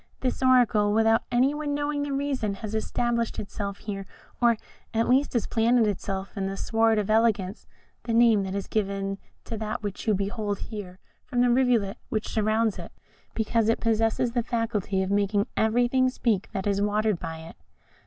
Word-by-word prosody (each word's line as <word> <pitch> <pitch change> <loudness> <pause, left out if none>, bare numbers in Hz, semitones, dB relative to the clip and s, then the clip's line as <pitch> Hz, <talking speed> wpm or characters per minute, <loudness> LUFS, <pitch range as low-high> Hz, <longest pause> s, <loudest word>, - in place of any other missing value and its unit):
This 255 0 -1
Oracle, 240 -5 +4
without 225 +1 +3
any 255 +4 +3
one 295 -1 -2
knowing 290 0 -1
the 285 0 -2
reason, 270 -7 -1
has 215 +1 -7
established 235 +1 -1
itself 200 -1 -4
here, 195 -2 -6 0.3
or 235 -2 +4 0.4
at 225 +1 +2
least 265 +3 +3
has 235 - +1
planted 235 +1 +3
itself 195 -1 -3
in 195 -2 -2
the 195 0 -4
Sward 225 0 +2
of 210 0 0
Eloquence 215 -3 +1 0.4
(the 230 - -1
name 230 -3 +5
that 190 0 -4
is 200 - -3
given 195 -2 -2 0.3
to 225 - -5
that 215 0 -4
which 205 +2 -5
you 215 - +4
behold 205 +1 -2
here, 195 -4 -7 0.3
from 245 - -1
the 245 0 +4
rivulet 240 -5 +2
which 215 -1 -2
surrounds 220 0 +1
it, - - -8 0.4
because 225 0 +1
it 225 - +2
possesses 225 +1 +1
the 240 0 0
faculty 220 -5 -1
of 190 - -3
making 200 0 +2
everything 245 +3 +2
speak 225 -6 -1
that 195 -3 -4
is 200 -1 +1
watered 210 -2 +1
by 165 -2 -5
it). 160 +1 -11
220 Hz, 180 wpm, -26 LUFS, 200-240 Hz, 0.4 s, name